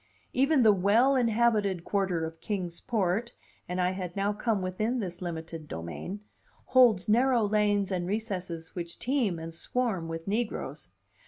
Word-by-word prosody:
Even 275 +1 +4
the 215 -2 +7
well 215 +8 +4
inhabited 220 -6 +2
quarter 185 -5 0
of 160 0 -8
Kings 180 -5 -3
Port 225 0 0 0.4
(and 180 +1 -2
I 180 0 +2
had 185 -2 -5
now 200 +1 +1
come 210 -2 -1
within 215 +7 -1
this 180 -4 -5
limited 165 -2 -5
domain) 85 - -6 0.4
holds 235 -8 +5
narrow 240 +2 +4
lanes 205 -1 +2
and 175 -2 -1
recesses 185 -6 -4
which 170 -2 -6
teem 245 -8 0
and 165 0 -7
swarm 200 -2 -1
with 165 +1 -6
negroes. 220 +3 -3
195 Hz, 150 wpm, -29 LUFS, 175-225 Hz, 0.4 s, the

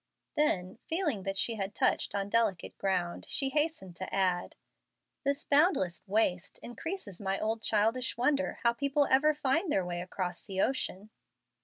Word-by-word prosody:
Then, 195 -10 +1
feeling 320 - 0
that 195 +1 -3
she 225 +3 +1
had 195 0 -4
touched - - +1
on 200 -1 -1
delicate 215 -4 0
ground, 180 -3 -1
she 275 -1 +1
hastened 295 - -1
to 185 - -6
add, 185 -2 0 0.7
"This 280 0 0
boundless 285 - +3
waste 190 -3 0
increases 240 - -6
my 195 0 -1
old 220 +1 -1
childish 225 +5 +1
wonder 280 +3 +1
how 235 0 +4
people 280 +3 +1
ever 300 +3 +5
find 295 +4 +1
their 190 - +1
way 175 0 -3
across 180 0 -4
the 190 -2 -6
ocean." 215 -4 -1
220 Hz, 155 wpm, -31 LUFS, 190-280 Hz, 0.7 s, ever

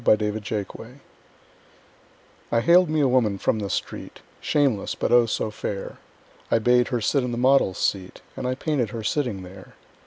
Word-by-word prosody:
My 110 - +6
Madonna 105 +2 -4 1.6
I 115 - +3
haled 175 +6 +5
me 155 -1 +1
a 140 - +4
woman 120 -6 +2
from 110 - 0
the 100 -2 -4
street, - - -5 0.2
Shameless, 135 -9 0
but, - - -2
oh, 120 -1 +5
so 110 0 -2
fair! 100 -2 -5 0.5
I - - +3
bade 125 +2 +3
her 120 -2 -2
sit 135 +5 +1
in 125 - -3
the 120 - -3
model's 130 -6 +3
seat 95 -2 -2
And 125 - -4
I 130 - -1
painted 135 -5 -1
her 110 +1 -6
sitting 110 -5 -1
there. 95 +1 -13
115 Hz, 175 wpm, -24 LUFS, 105-130 Hz, 1.6 s, My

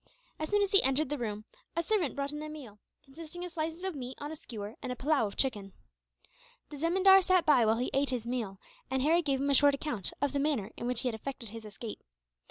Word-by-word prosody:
As 310 - -3
soon 415 0 +3
as 400 - -1
he 395 - +7
entered 270 +2 +1
the 295 - -2
room, 215 -2 -4 0.3
a 335 - 0
servant 355 -5 0
brought 280 0 -2
in 295 0 -5
a 305 - -5
meal; 260 -9 -10 0.3
consisting 330 +5 -8
of 355 - -7
slices 325 +2 -4
of 380 -1 -1
meat 260 -3 -7
on 290 +1 -5
a - - -5
skewer, 220 -8 -7
and 250 - -4
a - - -3
pillau 275 -3 +2
of 200 - -10
chicken. 205 -8 0 1.0
The 295 - -7
zemindar 380 +5 +6
sat 370 -2 +3
by 255 -7 +5
while 220 +1 +3
he 250 - -1
ate 275 +1 +2
his 245 -3 -2
meal, 235 -5 -3 0.3
and 265 0 0
Harry 330 +4 +4
gave 275 -4 0
him 280 +1 +1
a - - +3
short 285 +1 +6
account 270 - -1
of 285 0 0
the 285 - 0
manner 275 -8 0
in 240 - -4
which 245 -1 -1
he - - -1
had 245 - -1
effected 230 0 -4
his 225 +1 -9
escape. 215 +1 -7
275 Hz, 250 wpm, -31 LUFS, 235-315 Hz, 1.0 s, he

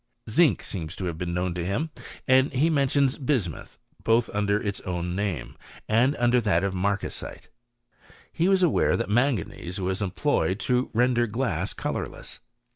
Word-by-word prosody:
Zinc 120 - +3
seems 85 -3 -4
to 95 - -5
have 85 -2 -4
been 90 -1 -2
known 90 0 -1
to 90 0 -3
him, 115 - -2 0.4
and 130 +2 +4
he 150 +5 +2
mentions 140 -2 +2
bismuth, 125 - -2 0.3
both 115 +1 +2
under 105 0 +1
its 100 -2 -3
own 90 -1 -3
name, 95 -9 -3 0.3
and 120 +6 +3
under 120 +1 +3
that 100 -5 +2
of 100 -1 0
marcasite. 100 +2 -3 0.8
He 170 +3 +1
was 190 -1 +4
aware 170 - +3
that 115 -3 -3
manganese 105 -6 0
was 95 +1 -1
em 100 - 0
ployed 95 -3 0
to 125 +1 +1
render 120 0 +3
glass 105 -6 -2
colourless. - - -5
105 Hz, 160 wpm, -26 LUFS, 95-130 Hz, 0.8 s, and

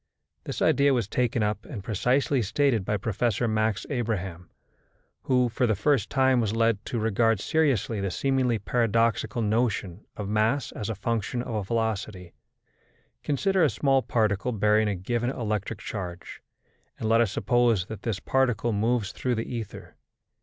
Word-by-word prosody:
This - - -3
idea 140 -1 +4
was 115 -6 0
taken 120 -1 0
up 105 0 -1
and 110 -9 -8
precisely 125 +6 +1
stated 115 0 +1
by 105 +2 -1
Professor 115 +4 0
Max 110 -2 0
Abraham, 95 -9 -3 0.8
who, 125 -1 +3
for 120 +1 0
the 110 - +2
first 125 +1 +1
time, 130 -2 +3
was 110 -1 -1
led 115 -2 +1
to 120 - -3
regard 115 0 +2
seriously 130 - +1
the 100 - -1
seemingly 130 +2 +1
paradoxical 115 +1 0
notion 105 -4 -1
of 105 - -4
mass 110 +6 +1
as 105 0 -5
a 110 - -2
function 115 +3 -2
of 105 -5 -4
velocity. 105 -5 -2 0.9
Consider 190 +5 +1
a 155 - +4
small 135 +4 +2
particle 110 -1 0
bearing 105 0 +2
a 105 - 0
given 120 +6 -2
electric 110 -4 -3
charge, 90 -4 -7 0.6
and 110 - -3
let 115 +1 +4
us 115 -5 +1
suppose 120 -7 +2
that 110 -1 -8
this 110 -5 -2
particle 120 0 +1
moves 110 0 0
through 125 -1 -2
the 115 +2 -4
ether. 110 -4 -8
115 Hz, 155 wpm, -26 LUFS, 105-125 Hz, 0.9 s, idea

